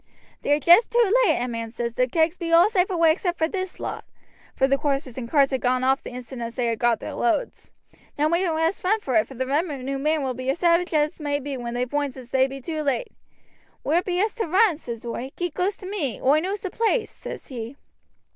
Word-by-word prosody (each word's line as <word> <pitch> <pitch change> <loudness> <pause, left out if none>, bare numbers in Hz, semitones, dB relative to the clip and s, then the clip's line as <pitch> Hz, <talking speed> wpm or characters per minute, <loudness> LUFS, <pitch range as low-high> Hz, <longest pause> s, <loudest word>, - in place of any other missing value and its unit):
"'They're 290 +1 +2
just 345 - +6
too 465 -4 +3
late,' 315 - +3
a - - -2
man 230 -1 -4
says; 235 0 -4
'the 250 +1 +1
kegs 320 +5 +1
be 340 -2 -4
all 340 +3 +7
safe 385 -3 +1
away 335 -3 +4
except 350 +1 -1
this 375 -2 -4
lot,' - - -5 0.5
for 265 - +3
the 275 0 +2
horses 275 -4 -1
and 235 -3 -6
carts 280 -1 +3
had 265 - -1
gone 255 0 +1
off 265 +1 +2
the - - -8
instant 250 0 -8
as 230 0 -5
they 235 -3 0
got 235 0 +1
their - - -6
loads. 345 - -1 0.5
'Now 300 +1 +2
we 340 +3 +1
must 325 +4 0
run 420 +4 +2
for 270 -11 -4
it, 215 - +3
for 270 - -11
the 260 +2 -2
revenue 275 -2 -2
men 305 +1 +1
will 260 -1 -1
be 255 +1 -4
as 275 - +1
savage 345 +1 +2
as 300 +3 +1
may 290 -1 -1
be 285 0 -5
when 240 -1 -5
they 245 +1 0
voinds 285 0 -2
as 250 -2 -11
they 265 0 +3
be 270 0 -7
too 310 +3 -4
late.' 275 -5 -1 0.7
'Where 325 +5 +2
be 360 -1 -2
us 425 +2 +1
to 445 - -1
run?' 375 0 +3
says 235 -6 -7
oi. 245 +3 -5
'Keep 350 -3 -3
close 385 +4 -1
to 375 - -11
me, 365 - -3
oi 285 +4 +4
knows 385 +4 -3
the 380 -3 -4
place,' 455 0 0
says - - -8
he. 240 0 -6
290 Hz, 240 wpm, -24 LUFS, 255-350 Hz, 0.7 s, all